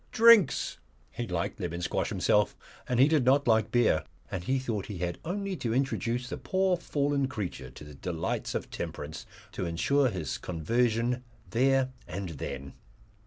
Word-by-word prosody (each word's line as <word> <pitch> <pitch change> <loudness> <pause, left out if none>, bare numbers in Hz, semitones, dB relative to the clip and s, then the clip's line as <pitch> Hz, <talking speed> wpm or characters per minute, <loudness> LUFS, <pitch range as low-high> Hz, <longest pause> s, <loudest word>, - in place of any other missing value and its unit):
Drinks! 225 - +5 0.3
He - - -4
liked - - -2
lemon 85 +2 -3
squash - - 0
himself - - +2 0.3
and 125 -1 +1
he 135 - +7
did 155 -3 +3
not 135 +2 +4
like 110 -2 +4
beer, 120 -9 +3 0.3
and 90 -2 -3
he 130 +8 +1
thought 115 -7 -3
he 105 - -5
had 85 0 -3
only 195 +3 -2
to 115 -4 -1
introduce 125 -2 0
the - - -4
poor 190 -1 +1
fallen 145 -4 0
creature 105 -8 -5
to - - -12
the 75 0 -11
delights 80 +3 -3
of - - -3
temperance 75 +2 -6 0.2
to 90 - -3
ensure 130 +11 +2
his 90 -8 -3
conversion 115 +7 0 0.3
there 130 +2 +3 0.2
and 95 -1 -4
then. 70 -3 -6
120 Hz, 165 wpm, -29 LUFS, 90-140 Hz, 0.3 s, he